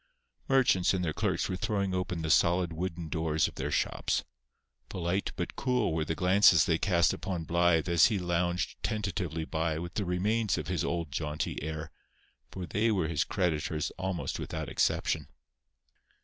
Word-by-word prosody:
Merchants 110 -9 +3
and 90 -1 -1
their 80 - -1
clerks - - 0
were 95 - -2
throwing 100 -1 -1
open 90 -2 -2
the 80 - 0
solid 85 0 +3
wooden 85 0 -4
doors 80 -1 +1
of - - -9
their - - -3
shops. - - 0 0.7
Polite 90 +2 -2
but 90 - -4
cool 125 -9 0
were 80 -1 0
the 80 +1 -2
glances 90 0 +5
they 80 -1 +1
cast 85 -3 +3
upon 90 -4 -4
Blythe 85 0 +2
as 85 -1 +5
he 110 - 0
lounged 85 -1 -1
tentatively 90 -6 -2
by 80 0 -1
with 85 +2 -6
the 105 - -1
remains 105 +5 0
of - - -4
his - - 0
old 85 -3 -2
jaunty 75 +1 -3
air; 80 +1 -5 0.6
for 95 +4 -6
they 105 +6 +1
were 90 -7 +1
his 75 -3 +1
creditors 80 -4 -1
almost 95 -2 -3
without - - -4
exception. - - 0
85 Hz, 165 wpm, -30 LUFS, 80-95 Hz, 0.7 s, glances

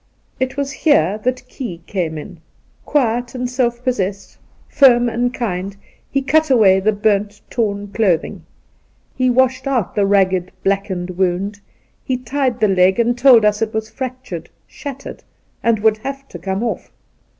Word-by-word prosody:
It 260 +1 -2
was 280 -1 -1
here 215 - +2
that 255 +2 -2
Key 235 -10 -6
came 170 -5 -3
ia. 150 - -7 0.6
Quiet 245 -3 0
and 250 0 -2
self 245 -1 -1
possessed, 200 -6 -3 0.3
firm 245 -3 +5
and 240 +1 0
kind, 195 -6 -3 0.3
he 275 0 0
cut 310 +2 +2
away 205 -7 +5
the 210 +3 +2
burnt, 205 0 0
torn 205 -4 -1
clothing. 195 -3 0 0.7
He 255 -1 +2
washed 255 +1 +2
out 250 -8 0
the 200 -1 +1
ragged, 190 -2 +2
black 195 0 +1
ened 180 -2 -5
wound; 190 +2 -1 0.4
he 260 -2 -1
tried 255 0 -1
the 215 - +3
leg, 190 +1 +3
and 235 +1 +2
told 245 -3 +6
us 210 0 +2
it 220 -1 -1
was 220 0 -3
fractured 255 - -6
— - - -42
shattered 275 -1 -8 0.2
— - - -42
and 230 -1 +3
would 220 0 +3
have 275 +4 -6
to 175 - -9
come 190 +4 -2
off". 235 - -4
220 Hz, 165 wpm, -18 LUFS, 195-255 Hz, 0.7 s, told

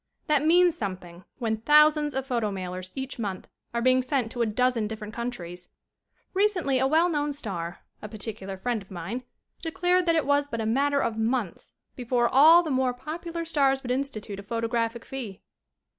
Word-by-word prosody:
That 300 -3 +2
means 345 +2 +5
something 185 - -6
when 225 -3 -1
thousands 300 +3 +4
of 265 0 -1
photo 235 -5 0
mailers 185 -1 -5
each 265 -1 -5
month 195 -4 -4 0.2
are 235 0 -2
being 255 0 +4
sent 255 -3 -1
to 240 - -3
a 230 - +2
dozen 235 0 +1
different 215 -1 -7
countries. 180 -8 -6 0.6
Recently 375 -9 +2
a 265 - +3
well 320 +5 +4
known 295 -3 -1
star, 185 - -5 0.2
a 210 - -7
particular 205 -2 -6
friend 235 +2 -2
of 195 - -16
mine, 190 +7 -5 0.4
declared 355 +1 +1
that 335 - +4
it 315 -4 +1
was 285 0 +2
but 230 -5 -4
a 220 - -1
mat 275 +6 +2
ter 280 - +3
of 225 -1 -1
months 225 -5 -2 0.2
before 245 -1 +1
all 315 +8 +7
the 315 - -3
more 260 -1 +1
popular 335 +4 -5
stars 275 -4 +2
would 245 - -3
institute 230 -7 -3
a - - -5
photographic 230 +2 -2
fee. 235 -8 -7
250 Hz, 185 wpm, -26 LUFS, 215-290 Hz, 0.6 s, all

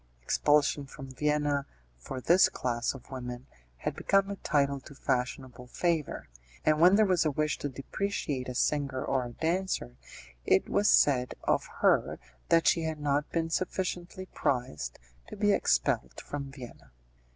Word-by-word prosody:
Expulsion 145 - +2
from 135 0 -10
Vienna, 145 0 0 0.3
for - - -7
this 175 +8 +5
class 120 0 -2
of 135 0 -13
women, 125 -1 -6 0.3
had - - -3
become 195 0 +2
a - - -3
title 140 -4 +1
to 140 +2 -14
fashionable 125 -1 -3
favour, 165 +3 -1 0.4
and 155 0 +3
when 180 +3 +7
there 215 +1 +5
was 185 -4 +2
a 155 - +2
wish 150 +1 -1
to 145 - -3
depreciate 135 -2 -3
a 125 - -5
singer 140 -1 0
or 135 -2 0
a 120 - -7
dancer, 165 - -2 0.5
it 95 - +3
was 205 +1 +2
said 125 -3 +4
of - - +1
her - - +3 0.3
that 165 0 +4
she 165 - +4
had 160 -1 -3
not 145 0 0
been 165 -1 -1
sufficiently 185 0 -3
prized 120 - -2 0.3
to - - -8
be 205 0 +2
expelled - - +1
from 140 -1 -6
Vienna. 130 -4 -11
145 Hz, 155 wpm, -29 LUFS, 130-165 Hz, 0.5 s, when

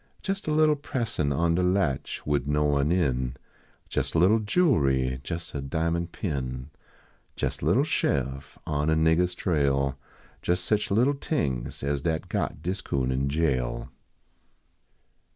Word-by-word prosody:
Jes 195 0 -1
a - - +1
little 155 0 +4
pressin 115 - -1
on 85 +4 +2
de 90 - +2
latch, 90 -7 0
wid 70 -2 0
no 75 +1 +2
one 70 +1 +2
in; 65 -8 +1 0.6
Jes - - -1
a - - +3
little 95 +7 +5
jewelry, 70 - +2
jes 85 +2 -5
a 70 - -3
diamond 85 +4 -1
pin; 65 -6 -4 0.7
Jes - - -2
a - - -3
little - - +4
sheriff 70 0 -1
on 75 0 0
a 80 - +3
niggah 80 +2 +4
s 90 0 -6
trail. 70 -6 +1 0.4
Jes 90 +1 +1
seen 105 +4 +1
little 120 +8 +3
tings 70 - -2
as 70 0 0
dat 80 0 -2
got 75 - -2
dis 95 +3 -2
coon 65 -7 -1
in 65 +2 0
jail. 70 -5 0
80 Hz, 150 wpm, -27 LUFS, 70-90 Hz, 0.7 s, little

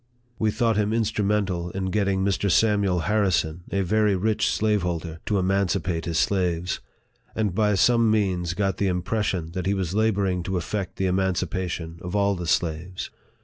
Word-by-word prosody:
We 110 - +2
thought 115 0 +1
him 105 0 +1
instrumental 105 -5 0
in 95 +1 -3
get 105 0 +1
ting 95 -1 0
Mr. 100 0 +1
Samuel 100 -3 +3
Harrison, 90 -3 0
a 100 - +1
very 105 +2 +2
rich 105 +3 +1
slaveholder, 90 -6 -1
to 105 - +1
emancipate 95 -2 0
his 85 -2 -1
slaves; 90 -1 0 0.6
and 105 -5 0
by 105 +1 +2
some 115 +3 +4
means 90 -5 0
got 95 -1 0
the 100 - +1
im 90 -1 -1
pression 95 -6 -1
that 90 +2 -3
he 100 - +2
was 95 -3 -2
laboring 100 -4 +1
to 95 +1 -2
effect 95 +2 -3
the 95 - -1
emancipa 95 -1 0
tion 80 0 -6
of 90 +2 -5
all 100 0 +3
the 90 -2 -5
slaves. 80 +5 -1
95 Hz, 175 wpm, -25 LUFS, 90-105 Hz, 0.6 s, some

